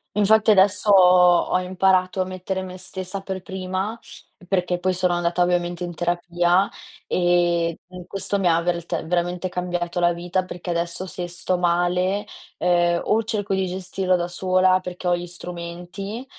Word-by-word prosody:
Infatti 215 +1 +4
adesso 200 +1 +3
ho 180 -2 +7 0.2
ho 180 - +4
imparato 185 0 +1
a - - 0
mettere 185 +1 -4
me 185 0 -8
stessa 190 +1 -6
per 190 -1 -5
prima, 190 +4 -4 0.5
perché 180 -1 0
poi 185 +1 0
sono 180 -1 +1
andata 175 0 0
ovviamente 175 0 0
in 175 -1 -5
terapia 175 +2 +1 0.4
e, 175 -2 +1
mhmm, 180 -1 -10
questo 195 +1 -2
mi 185 - +1
ha 170 0 +3
vert 170 -2 -2
veramente 175 +1 -1
cambiato 175 -1 -3
la 175 0 +3
vita, 175 +2 -2
perché 175 0 -8
adesso 170 +2 -2
se 180 -1 -5
sto 175 +1 -2
male, 180 +3 +1 0.3
uhm, 175 -1 +2
o 225 +1 +2
cerco 210 -3 -2
di 190 -1 0
gestirlo 185 0 -1
da 175 0 -1
sola 185 +1 +2
perché 180 0 -6
ho 175 - +3
gli 175 0 -6
strumenti, 175 +6 -7
180 Hz, 160 wpm, -23 LUFS, 175-190 Hz, 0.5 s, ho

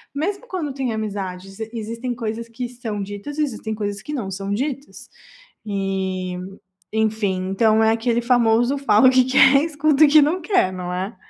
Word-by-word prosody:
mesmo 395 +10 -3
quando 320 - -4
tem 265 -3 -2
amizades, 195 -2 -5
existem 230 +2 -4
coisas 230 0 -5
que 245 +2 -5
são 225 -5 -5
ditas 205 +9 -7
e 305 - +2
existem 220 -5 -4
coisas 205 -2 -4
que 295 - -8
não 220 -10 -4
são 195 +1 -5
ditas. 275 +5 -4 0.6
E 190 -3 -3 0.5
enfim, 210 -4 0
então 220 +2 +3
é 220 - +4
aquele 230 +1 +1
famoso 245 +2 +2
falo 260 -1 +5
que 255 -1 +4
quer 270 +2 +5
escuta 305 -1 +2
o - - +4
que 300 -1 +7
não 340 +5 0
quer, 340 - +1
não 180 -1 -5
é? 190 +3 -4
225 Hz, 170 wpm, -21 LUFS, 200-270 Hz, 0.6 s, que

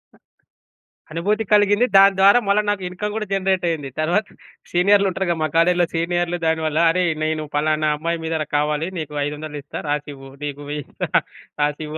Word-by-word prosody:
అ - - -23 0.9
అనుభూతి 205 +7 0
కలిగింది. 205 +3 +4
దాని 195 0 +7
ద్వారా 200 +5 +7
మళ్ళా 200 +1 +3
నాకు 205 -2 -1
ఇన్కమ్ 205 +3 -4
గూడా 215 -1 -3
జనరేట్ 190 -2 0
అయ్యింది. 145 -5 -3
తరువాత 175 +7 +1 0.5
సీనియర్‌లుంటరు 190 +1 +2
గదా! 170 - 0
మా - - +2
కాలేజిలో 175 +1 +4
సీనియర్‌లు. 175 +1 -1
దానివల్ల 160 -1 0
"అరేయ్! 175 0 +1
నేను 155 -1 -2
పలానా 155 +1 +1
అమ్మాయి 165 +2 -2
మీద 160 -1 -1 0.2
కావాలి 150 +3 0
నీకు 150 -1 -6
500 150 0 -6
ఇస్తా 145 - -7
రాసివ్వు. 145 -2 -4
నీకు 145 0 -6
వెయ్యిస్తా 150 -2 -5 0.5
రాసివ్వు." 150 +1 -2
165 Hz, 155 wpm, -21 LUFS, 150-190 Hz, 0.9 s, దాని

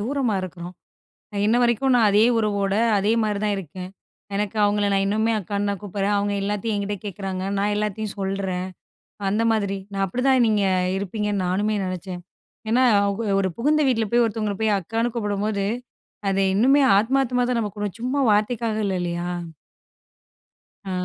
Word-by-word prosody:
தூரமா 250 -2 0
இருக்குறோம். 180 0 -7 0.6
அ - - -7
இன்ன 225 +3 +3
வரைக்கும் 240 +2 +2
நான் 230 -3 +5
அதே 210 +2 +5
உறவோட, 200 -3 0 0.2
அதே 205 +3 +2
மாரிதான் 210 0 0
இருக்கேன். 185 +1 -7 0.5
எனக்கு 210 +1 -2
அவங்கள 205 0 +2
நான் 195 0 +2
இன்னமுமே 220 +3 +1
அக்கான்னு 205 +1 -2
தான் 200 - -4
கூப்பிடுறேன். 205 0 -1
அவங்க 205 0 0
எல்லாத்தையும் 210 +2 -1
என்கிட்ட 200 0 -2
கேட்குறாங்க. 195 -2 -4
நான் 205 +1 +1
எல்லாத்தையும் 210 0 -2
சொல்றேன். 190 -2 -2 0.6
அந்த 210 +3 +1
மாதிரி. 200 -3 0 0.2
நான் 195 0 0
அப்படித்தான் 250 +5 +2
நீங்க 210 -2 +2 0.3
இருப்பீங்கன்னு 200 0 -2
நானுமே 205 +4 0
நெனச்சேன். 185 0 -5 0.5
ஏன்னா 245 +3 +3 0.2
அவுங்க 200 +2 -1
ஒரு 190 - +1
புகுந்த 300 +5 +2
வீட்ல 225 -4 +1
போய் 240 0 +4
ஒருத்தவங்கள 215 -2 -2
போய் 215 -2 +3
அக்கான்னு 225 +6 -2
கூப்பிடும்போது, 205 -2 -1 0.6
அது 195 0 +1
இன்னுமே 270 +7 +5 0.2
ஆத்மார்த்தமா 250 +2 +1
தான 245 - +1
நம்ம 210 - -2
கூப்புடுவோம், 205 0 -5
சும்மா 270 +3 0
வார்த்தைக்காக 215 +1 0
இல்ல, 190 - -1
இல்லையா? 175 0 -3 1.6
ஆ. 195 - -6
205 Hz, 155 wpm, -23 LUFS, 195-225 Hz, 1.6 s, நான்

